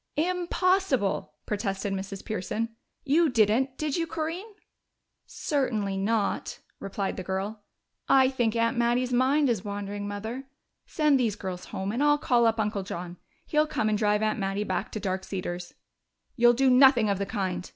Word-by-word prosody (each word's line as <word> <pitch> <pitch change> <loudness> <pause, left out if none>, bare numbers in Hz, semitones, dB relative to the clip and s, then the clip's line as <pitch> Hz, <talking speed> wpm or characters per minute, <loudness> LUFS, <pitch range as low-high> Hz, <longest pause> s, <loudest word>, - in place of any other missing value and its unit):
"Impossible!" 355 - +1
protested 200 -1 -2
Mrs. 195 0 -5
Pearson. 220 +2 -2 0.4
"You 310 +4 +4
didn't, 245 +3 +2
did 305 -1 -1
you, 330 -1 -1
Corinne?" 330 +7 -4 0.7
"Certainly 220 -9 -1
not," 210 +1 -1 0.2
replied 195 0 -3
the 185 - -4
girl. 195 +4 -3 0.5
"I 265 -1 +6
think 240 -4 0
Aunt 230 +2 +1
Mattie's 240 +1 +1
mind 270 +4 +3
is 225 -6 0
wandering, 205 0 -4
Mother. 220 +6 -5 0.4
Send 300 -4 +2
these 225 -5 +1
girls 185 -4 -6
home, 190 +1 -4
and 240 +5 -2
I'll 295 0 +4
call 240 -5 +3
up 225 0 +1
Uncle 210 -2 0
John. 180 -2 -6 0.3
He'll 305 0 +2
come 215 -7 0
and 215 - +2
drive 210 0 +2
Aunt 215 0 0
Mattie 195 +1 -1
back 190 0 -3
to 215 - -3
Dark 190 -1 -2
Cedars." 180 -2 -5 0.6
"You'll 240 -1 +6
do 265 +2 +3
nothing 250 -3 +6
of 200 -2 0
the 200 - -2
kind!" 185 -4 -3
220 Hz, 160 wpm, -27 LUFS, 195-265 Hz, 0.7 s, I